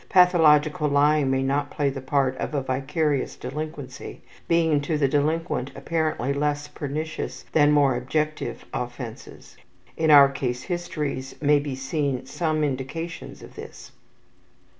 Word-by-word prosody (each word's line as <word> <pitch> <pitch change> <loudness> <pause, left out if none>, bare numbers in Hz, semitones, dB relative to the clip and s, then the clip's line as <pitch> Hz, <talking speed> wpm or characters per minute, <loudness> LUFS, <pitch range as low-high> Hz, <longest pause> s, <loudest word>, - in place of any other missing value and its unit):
pathological 155 -5 +5
lying 145 0 +3
may 135 0 +1
not 140 +2 0
play 145 - -1
the 135 -1 -3
part 130 -1 +1
of 150 - -4
a 140 - +1
vicarious 135 +2 -1
delinquency 140 0 -7 0.3
being 165 -3 +3
to 150 +2 -1
the 145 -2 +2
delinquent 150 -1 0
apparently 155 -5 -1
less 145 +1 -1
pernicious 155 +3 -5
than 150 -1 +4
more 140 -3 +4
objective 140 0 -2
offenses. 120 -2 -7 0.4
In 160 -1 +1
our 140 -2 +9
case 125 -2 -3
histories 150 -7 -4
may 145 0 +4
be 140 -2 -4
seen 135 0 -2
some 155 +2 -1
indications 150 +5 -4
of - - -12
this. - - -11
145 Hz, 135 wpm, -24 LUFS, 135-155 Hz, 0.4 s, our